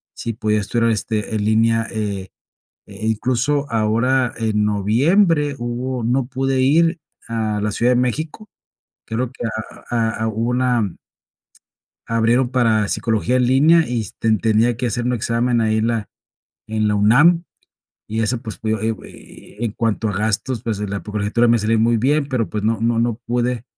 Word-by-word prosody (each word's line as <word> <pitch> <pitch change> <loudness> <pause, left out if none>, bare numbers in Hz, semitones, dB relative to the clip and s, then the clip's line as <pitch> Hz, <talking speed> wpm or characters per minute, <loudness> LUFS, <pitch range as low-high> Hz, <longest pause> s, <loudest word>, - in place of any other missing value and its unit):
si 115 - -4
podía 105 0 0
estudiar, 115 +2 0
este, 110 0 -2
en 105 - -1
línea, 115 +1 +2
eh 100 -4 -3 0.6
eh, 100 +2 -7
incluso 130 +6 0
ahora 115 +3 +1
en 110 -2 0
noviembre 145 - +2
hubo 120 +1 -3
no 125 +3 0
pude 130 0 -1
ir 165 +5 +3 0.3
a 110 -2 -1
la 105 - 0
Ciudad 120 +4 +2
de - - +2
México, 155 - -3 0.6
creo 120 +2 -3
que 125 - -6 0.4
a 115 -2 +1
a - - +1
hubo 110 +2 -1
una 125 -6 0 1.1
abrieron 115 +2 +2
para 115 -5 +2
psicología 115 +3 0
en 125 -1 +2
línea 155 +5 +4
y 120 -2 -1
s 105 - -7
te 115 - 0
tenía 110 +2 +2
que 125 +1 -2
hacer 120 +2 -2
un 125 - +1
examen 120 +1 0
ahí, 110 0 +1
en 110 +1 +1
la 115 -3 -2 0.6
en 110 -1 0
la 105 - +1
UNAM, 150 +12 +5 0.6
y 110 +1 -3
eso, 110 +2 0
pues, 110 -4 -7
eh 110 0 0
eh, - - -14
en 115 -3 -1
cuanto 110 -1 -1
a - - -3
gastos, 110 +3 -1
pues, 110 -4 -3
la 100 -1 -3
colegiatura, 105 +3 0
pues, - - +4
me 120 - +4
salía 110 +2 +1
muy 115 +1 +3
bien, 140 +5 +1
pero, 125 -5 -1
pues, 105 -1 -4
no 110 0 +1
no 115 0 +1
no 120 -1 +1
pude 120 -1 -1
115 Hz, 175 wpm, -20 LUFS, 110-125 Hz, 1.1 s, UNAM